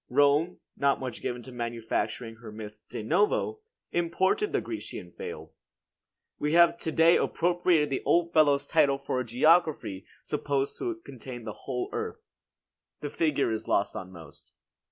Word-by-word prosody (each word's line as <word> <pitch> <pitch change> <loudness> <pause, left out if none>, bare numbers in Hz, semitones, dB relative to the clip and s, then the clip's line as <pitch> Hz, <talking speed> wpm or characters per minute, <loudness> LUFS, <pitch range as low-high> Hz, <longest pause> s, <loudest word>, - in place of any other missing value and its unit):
Rome, 145 +6 +3 0.2
not 140 0 +2
much 130 -3 -5
given 120 0 -3
to 130 - -10
manufacturing 115 -1 -3
her 115 -2 -10
myths 105 0 -9
de - - -6
novo, 205 - +1 0.3
imported 185 - +1
the - - +2
Grecian - - -7
fable. 460 -1 -8 0.9
We 150 +1 0
have 170 0 +6
to 160 - -3
day 165 +2 +6
appropriated 175 -3 +2
the 135 - -1
old 170 0 +2
fellow's 145 -3 +4
title 145 -4 +3
for 135 -2 -2
a - - 0
geography 125 - +2 0.2
supposed 140 -1 -1
to 360 -3 -2
contain 125 -1 -8
the 110 -1 -5
whole 125 +2 -4
earth. - - -4 0.8
The 145 - -4
figure 155 -7 +1
is 110 - -3
lost 100 - +1
on 95 0 -6
most. 80 -5 -14
140 Hz, 155 wpm, -28 LUFS, 115-170 Hz, 0.9 s, have